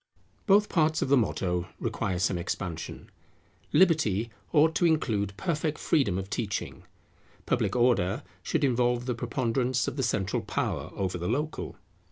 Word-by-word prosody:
Both 205 Hz, +1 st, +5 dB
parts 155 Hz, -2 st, +2 dB
of -, -, -3 dB
the 140 Hz, -, +6 dB
motto 90 Hz, -7 st, 0 dB
require 95 Hz, -, -2 dB
some 90 Hz, 0 st, +1 dB
expansion. 85 Hz, -1 st, -5 dB, 0.6 s
Liberty 120 Hz, -, +3 dB, 0.2 s
ought 160 Hz, +1 st, +4 dB
to 175 Hz, -, +3 dB
include 105 Hz, -11 st, 0 dB
perfect 155 Hz, -, -1 dB
freedom 130 Hz, -, +1 dB
of 95 Hz, 0 st, -4 dB
teaching; 100 Hz, -1 st, -4 dB, 0.6 s
Public -, -, 0 dB
Order 120 Hz, -6 st, +2 dB, 0.2 s
should 155 Hz, -, -1 dB
involve 125 Hz, -2 st, +2 dB
the 125 Hz, -, 0 dB
preponderance 125 Hz, +1 st, 0 dB
of -, -, -4 dB
the -, -, 0 dB
central 100 Hz, -6 st, 0 dB
power -, -, -2 dB
over 95 Hz, -2 st, -2 dB
the 90 Hz, -, -3 dB
local. 150 Hz, +6 st, -2 dB
120 Hz, 145 wpm, -28 LUFS, 95-150 Hz, 0.6 s, the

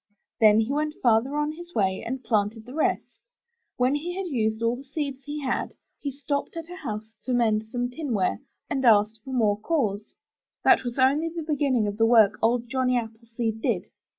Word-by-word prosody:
Then 215 Hz, 0 st, +6 dB
he 225 Hz, +4 st, -2 dB
went, 300 Hz, +1 st, -1 dB
farther 240 Hz, +4 st, +2 dB
on 295 Hz, 0 st, 0 dB
his 345 Hz, +2 st, -11 dB
way 190 Hz, -3 st, +1 dB
and 260 Hz, +2 st, -4 dB
planted 215 Hz, 0 st, 0 dB
the 250 Hz, -, -10 dB
rest. 310 Hz, -, -1 dB, 0.6 s
When 255 Hz, +1 st, +2 dB
he 340 Hz, +5 st, -3 dB
had 390 Hz, -, -2 dB
used 220 Hz, -7 st, -1 dB
all 230 Hz, +1 st, +2 dB
the 265 Hz, -, -10 dB
seeds 275 Hz, -1 st, -5 dB
he 295 Hz, +1 st, -5 dB
had, 260 Hz, -, -2 dB, 0.2 s
he 285 Hz, -, -3 dB
stopped 285 Hz, +3 st, -3 dB
at 330 Hz, +1 st, -7 dB
a -, -, -6 dB
house 220 Hz, -, -6 dB
to 255 Hz, -, -2 dB
mend 220 Hz, -2 st, +2 dB
some 245 Hz, 0 st, -1 dB
tinware, 245 Hz, -, -1 dB, 0.3 s
and 270 Hz, -1 st, -2 dB
asked 215 Hz, -2 st, +4 dB
for 265 Hz, -, -8 dB
more 215 Hz, -5 st, +2 dB
cores. 215 Hz, -6 st, -1 dB, 0.5 s
That -, -, +5 dB
was 245 Hz, 0 st, -4 dB
only 280 Hz, +5 st, +3 dB
the 330 Hz, 0 st, -5 dB
beginning 280 Hz, -7 st, +1 dB
of 205 Hz, 0 st, -3 dB
the 225 Hz, 0 st, +4 dB
work 220 Hz, -3 st, +5 dB
Old 235 Hz, +1 st, +2 dB
Johnny 255 Hz, 0 st, +1 dB
Appleseed 225 Hz, -1 st, -4 dB
did. -, -, -1 dB
245 Hz, 195 wpm, -26 LUFS, 220-285 Hz, 0.6 s, Then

